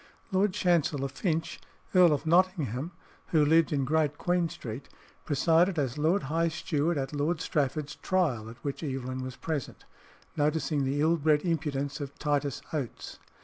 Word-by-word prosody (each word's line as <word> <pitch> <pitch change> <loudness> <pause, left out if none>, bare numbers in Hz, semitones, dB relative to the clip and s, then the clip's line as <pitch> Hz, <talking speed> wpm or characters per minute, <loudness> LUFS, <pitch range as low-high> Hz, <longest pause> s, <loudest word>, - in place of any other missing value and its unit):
Lord 190 +1 +2
Chancellor 155 -6 +1
Finch, 160 +2 -2 0.3
Earl 180 -3 +7
of 150 +1 0
Nottingham, 165 - +2 0.4
who 155 -3 +3
lived 160 +2 +4
in 140 -3 +1
Great 150 0 +1
Queen 175 -1 +1
Street, 125 -1 -7 0.4
presided 165 +5 +3
as 135 -4 0
Lord 160 +6 +1
High 165 +5 +1
Steward 160 -1 -1
at 135 +1 -3
Lord 150 +3 0
Strafford's 145 -1 -1
trial, 145 - 0
at 115 - -11
which 140 -1 -3
Evelyn 130 -3 -3
was 130 0 -6
present, 155 -5 -5 0.5
noticing 150 -1 +1
the 140 +2 0
ill 165 +2 +3
bred 150 -1 +2
impudence 145 -4 -2
of 140 -1 -7
Titus 145 -3 -1
Oates. 140 -7 -5
150 Hz, 150 wpm, -29 LUFS, 140-165 Hz, 0.5 s, Earl